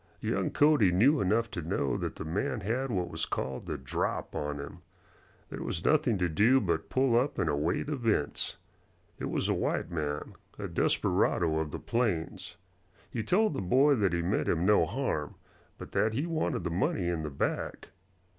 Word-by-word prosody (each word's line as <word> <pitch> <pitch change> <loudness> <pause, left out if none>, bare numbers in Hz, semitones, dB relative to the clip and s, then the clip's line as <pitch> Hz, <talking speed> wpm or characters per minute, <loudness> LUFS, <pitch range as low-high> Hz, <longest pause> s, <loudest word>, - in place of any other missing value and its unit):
Young - - -1
Cody 145 -11 +4
knew 130 - +4
enough 110 +5 +1
to 85 - -4
know 80 -4 -1
that - - -3
the - - -6
man 100 +6 -2
had 120 +7 -1
what 90 -6 -1
was 80 0 -2
called 65 0 -4
the - - -3
"drop" 65 0 -3
on 75 -1 -3
him. 70 - -8 0.7
There - - -6
was 80 - -3
nothing 150 -8 +3
to 90 -1 +1
do 110 +11 +4
but 85 -7 -1
pull 130 -2 +2
up 130 +4 +1
and 95 - 0
await 75 - 0
events. 115 - -1 0.6
It - - -3
was - - -1
a - - +2
white 85 - -1
man 75 -3 -3 0.2
a - - -4
desperado 80 -2 +1
of 80 -1 -2
the - - -5
plains. 110 -9 -2 0.5
He 115 - -2
told 190 - +2
the 135 - -3
boy 130 +10 +4
that 100 -8 +2
he 85 0 0
meant 95 +5 0
him 85 +1 +1
no 105 -5 +4
harm, 95 - -2 0.4
but - - -9
that 105 +3 +1
he 140 +8 -1
wanted 160 - -1
the 85 - -2
money 90 0 0
in 85 -2 -1
the 75 - -4
bag. 70 - -3
95 Hz, 185 wpm, -30 LUFS, 80-125 Hz, 0.7 s, Cody